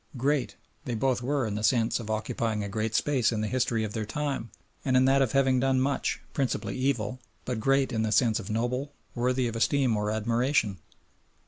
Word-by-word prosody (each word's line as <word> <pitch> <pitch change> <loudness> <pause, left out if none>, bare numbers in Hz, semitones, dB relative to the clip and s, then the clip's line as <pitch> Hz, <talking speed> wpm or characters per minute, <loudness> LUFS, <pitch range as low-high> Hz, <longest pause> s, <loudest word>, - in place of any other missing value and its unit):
"Great" 140 +1 0 0.3
they 120 - -2
both 125 +1 +1
were 135 +1 0
in 105 - -3
the 105 - -3
sense 115 0 +2
of 110 -2 -7
occupying 110 0 -1
a - - -3
great 110 +2 -2
space 130 -5 +2
in 110 -2 -1
the 110 - -1
history 115 -1 0
of 105 -1 -4
their 110 - -2
time 135 +1 -3 0.3
and 130 -2 +2
in 130 - +5
that 135 +1 +4
of 130 -5 +1
having 135 -2 +3
done 135 0 +2
much, 140 +2 0
principally 135 -3 -1
evil, 130 -3 -1 0.3
but 125 -3 -2
"great" 135 +2 +2
in 110 - 0
the 110 -1 0
sense 115 0 +3
of 100 - -8
noble, 125 +6 -2 0.2
worthy 125 +1 +1
of 115 - -4
esteem 125 0 +2
or 105 0 -1
admiration! 115 - +1
120 Hz, 205 wpm, -28 LUFS, 110-135 Hz, 0.3 s, in